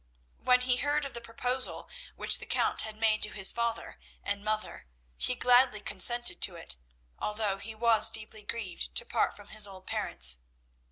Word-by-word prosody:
When 250 0 +3
he 250 0 +2
heard 290 +2 0
of 275 - -7
the 235 - -6
proposal 250 +2 -2 0.3
which - - +3
the - - -9
Count - - +1
had 220 -1 -5
made 220 -1 +1
to 215 - +2
his 195 -2 +5
father 235 -1 -4 0.2
and 200 0 -3
mother, 215 - -3 0.3
he 250 - -1
gladly 245 -3 +4
consented 240 +3 +1
to 180 - +3
it, 165 - -8 0.4
although 210 -2 -2
he 220 +2 -7
was 225 -1 +5
deeply 215 -1 -8
grieved 210 -4 -5
to - - +4
part - - -1
from - - -15
his 215 -1 +2
old 190 -1 -12
parents. 60 0 -2
220 Hz, 175 wpm, -29 LUFS, 205-240 Hz, 0.4 s, his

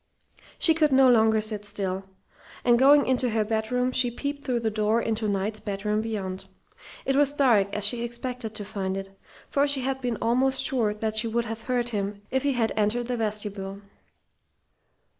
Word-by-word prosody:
She 325 - +5
could 310 -2 +2
no 265 0 +6
longer 220 -2 +4
sit 215 -1 -2
still, 195 -2 -3 0.6
and 240 -1 +5
going 285 +2 +6
into 255 -1 +1
her 220 -1 0
bedroom 225 +4 0
she 255 -1 +3
peeped 285 +4 -5
through 245 -2 -1
the 220 -1 0
door 215 +1 +1
into 225 -1 -1
Knight's 205 +2 -2 0.2
room 210 0 +1
beyond. 195 -4 -4 0.6
It 270 - +1
was 285 0 +3
dark, 230 -9 +3
as 210 -1 -1
she 235 +3 0
expected 240 -1 -4
to 205 - -5
find 195 -2 -3
it; 195 0 -8 0.4
for 285 +1 +2
she 280 -2 -1
had 265 +1 -2
been 245 -3 -2
almost 260 +3 +1
sure 245 -8 +1
that 220 0 -2
she 220 - +4
would 235 +1 -1
have 225 0 -6
heard 245 -1 0
him 205 -2 -4
if 265 - +1
he 285 0 +1
had 230 -3 0
entered 220 +3 0
the 245 - -1
vestibule. 205 -2 -3
225 Hz, 185 wpm, -26 LUFS, 210-255 Hz, 0.6 s, no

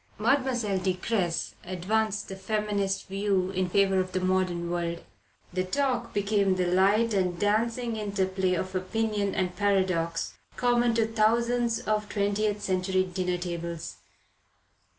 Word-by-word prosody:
Mademoiselle 245 -8 +1
de 185 0 0
Cressy 180 -3 -1
advanced 205 +4 -1
the 190 - -6
feminist 205 -1 -1
view 195 -1 0
in 185 -1 -1
favour 195 0 +3
of 185 0 -2
the 185 - +1
modern 185 -2 0
world. 170 -1 -2 0.5
The 185 0 0
talk 245 +4 -1
became 200 -1 +2
the 185 -1 +1
light 200 +6 +3
and 180 -3 +1
dancing 225 +4 0
interplay 190 -3 0
of 185 +2 -3
opinion 205 +1 -1
and 180 -1 -1
paradox 185 -5 0 0.2
common 240 -1 +2
to 225 -1 +3
thousands 230 +2 +1
of 210 -1 -1
twentieth 205 0 0
century 185 -1 +1
dinner 180 -1 -2
tables. 170 -2 -5
195 Hz, 130 wpm, -28 LUFS, 185-215 Hz, 0.5 s, favour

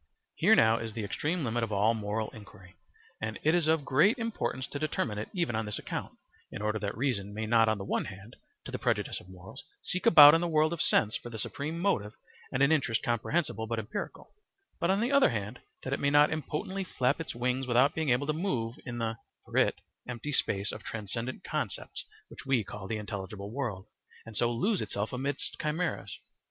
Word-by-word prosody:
Here - - +5
now 110 +1 +5
is 115 -1 -5
the 115 - -4
extreme 155 - -1
limit 120 0 0
of 115 - -2
all 105 +3 +3
moral 110 0 -2
inquiry, 95 -4 -14 0.5
and 110 0 -3
it 155 - +4
is 175 -3 +2
of 160 -3 +2
great 190 - +4
importance 225 - -2
to 145 - -5
determine 130 -8 -1
it 105 - -5
even 170 - -1
on 110 -1 -1
this 105 - -3
account, - - -5 0.3
in - - -6
order 105 0 0
that 100 0 -3
reason 105 -6 -1
may 110 +1 -2
not 115 0 +4
on 110 - +1
the 95 - -6
one - - 0
hand, 100 +4 -10 0.3
to - - -7
the - - -4
prejudice - - 0
of 90 - -16
morals, 95 0 -11 0.2
seek 185 - -1
about 145 -2 +11
in 165 - +4
the 175 - 0
world 155 0 +3
of 170 - -2
sense 110 0 +3
for 120 - -5
the 115 - -7
supreme 145 +9 -3
motive 115 - 0 0.4
and 135 +1 +2
an 140 - +5
interest 130 -7 +1
comprehensible 120 0 -1
but 115 +1 -2
empirical; 110 +3 -5 0.5
and 170 - +3
on 195 +2 +2
the 240 +4 +1
other 280 -1 +6
hand, 110 +1 -4 0.2
that 135 - -2
it - - -1
may 140 - +2
not 145 +2 +5
impotently 160 +5 -3
flap 140 -4 0
its 160 - -6
wings 125 +2 -1
without 125 +4 +4
being 160 -3 -1
able 125 +3 +2
to 155 - 0
move 130 - -1
in 120 -1 -4
the 115 -1 -2 0.3
(for - - -10
it) - - +3 0.3
empty 120 +4 -4
space 100 -5 0
of - - -7
transcendent 115 +3 -5
concepts - - -4 0.2
which - - -11
we 130 -4 +2
call 95 0 -8
the 110 - -2
intelligible 100 -1 -6
world, 115 -9 -3 0.4
and 110 -1 -10
so 120 +2 +2
lose 190 - +1
itself 100 +4 -3
amidst 135 +2 -3
chimeras. 160 +3 -2
120 Hz, 215 wpm, -30 LUFS, 110-150 Hz, 0.5 s, about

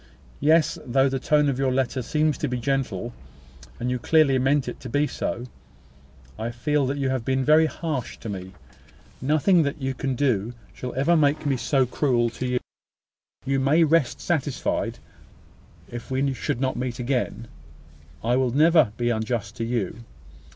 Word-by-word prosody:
Yes; 155 +2 +3
though 135 +2 +2
the 135 0 -1
tone 150 +2 +3
of 135 -2 -1
your 135 -1 +2
letter 130 0 0
seems 150 +4 +1
to 150 - -1
be 125 -1 -2
gentle, 120 -4 -2 0.7
and 125 +1 -1
you 125 - -1
clearly 145 -2 +3
mean 135 +2 +2
it - - -6
to 125 - -8
be 145 +5 +2
so, 120 -4 -3 0.9
I 115 +1 -2
feel 140 +4 0
that 140 +2 -2
you 135 -2 0
have 130 -3 -1
been 130 +1 0
very 155 +1 +5
harsh 155 -6 -4
to - - -7
me. 95 -2 -6 0.7
Nothing 155 +6 +3
that 140 0 -2
you 135 -1 -2
can 130 0 -2
do 120 -4 0 0.2
shall 125 - -6
ever 140 +6 +3
make 150 -1 +2
me 140 -2 +2
so 130 +2 +1
cruel 120 -2 +1
to 125 +2 -4
you. 125 0 0 0.9
You 135 0 +1
may 145 +5 +4
rest 160 -5 +2
satisfied 150 -6 -1 0.9
that, - - -11
if 120 - -10
we 135 +1 0
should 120 - -3
not 130 0 0
meet 125 -1 -3
again, 125 -2 -2 0.8
I 120 +2 +2
will 130 -1 +2
never 150 -3 +4
be 120 0 +1
unjust 110 -2 -2
to 115 - -2
you. 115 -1 -2
130 Hz, 175 wpm, -24 LUFS, 120-145 Hz, 0.9 s, very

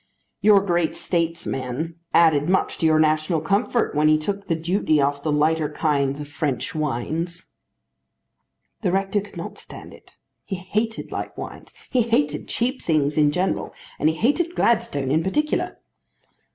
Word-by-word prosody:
"Your 205 -2 +6
great 175 -4 0
statesman 165 -3 -2 0.2
added 160 -2 +4
much 190 - +1
to 165 - +3
your 155 0 +4
national 155 +1 +2
comfort 200 +9 0
when 150 +1 +3
he 155 0 +5
took 200 +5 -4
the 165 - +1
duty 165 -1 +1
off 140 0 +1
the 155 - -1
lighter 155 +1 +2
kinds 145 -2 0
of 145 - -6
French 145 -2 -2
wines." 155 +4 -3 1.3
The - - +1
rector 195 +2 +1
could 205 - -12
not - - -7
stand - - -11
it. - - -18 0.3
He 195 - -4
hated 210 +5 -3
light - - -5
wines. - - -9 0.2
He 255 - +3
hated 150 -11 0
cheap 255 +3 -1
things 150 -3 +1
in 150 -1 +4
general. 180 +5 -1 0.2
And 155 - +3
he 160 - -1
hated 325 - +1
Gladstone 145 - +1
in 155 +3 +3
particular. 300 - -1
160 Hz, 155 wpm, -23 LUFS, 150-195 Hz, 1.3 s, Your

